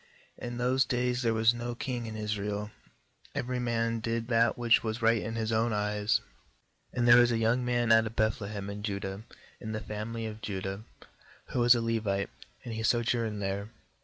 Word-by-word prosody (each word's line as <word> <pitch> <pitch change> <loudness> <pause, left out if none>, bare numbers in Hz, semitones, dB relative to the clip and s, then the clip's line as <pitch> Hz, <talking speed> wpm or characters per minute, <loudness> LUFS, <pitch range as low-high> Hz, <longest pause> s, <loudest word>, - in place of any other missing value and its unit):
6In 120 0 -5
those 125 +2 +3
days 125 0 0
there 115 -2 +2
was 110 +1 +4
no 120 0 -4
king 120 -1 -3
in 110 - -6
Israel; 105 0 -3 0.6
every 125 +1 -2
man 115 -1 0
did 115 +1 -2
that 115 -1 +3
which 120 -1 +4
was 110 +1 -3
right 115 -1 +4
in 115 +1 -4
his 110 -1 -1
own 110 +1 +2
eyes. 105 0 +1 0.8
7And 120 - +2
there 120 0 +8
was 120 0 +5
a 115 - +1
young 115 +3 +2
man 120 -1 +1
out 110 0 +6
of 110 - -8
Beth 110 +3 +1
lehem 100 -1 -5
in 100 0 -6
Judah 100 -1 -4 0.2
— - - -25
in 110 0 -5
the 110 - -2
family 110 +1 -5
of 110 0 -6
Judah 95 -1 -4 0.3
— - - -26
who - - -2
was 120 +1 +7
a 120 - 0
Levite, 110 -4 -1 0.3
and 120 - -5
he 110 - -3
sojourned 115 -2 +1
there. 100 +2 -2
115 Hz, 200 wpm, -30 LUFS, 105-120 Hz, 0.8 s, there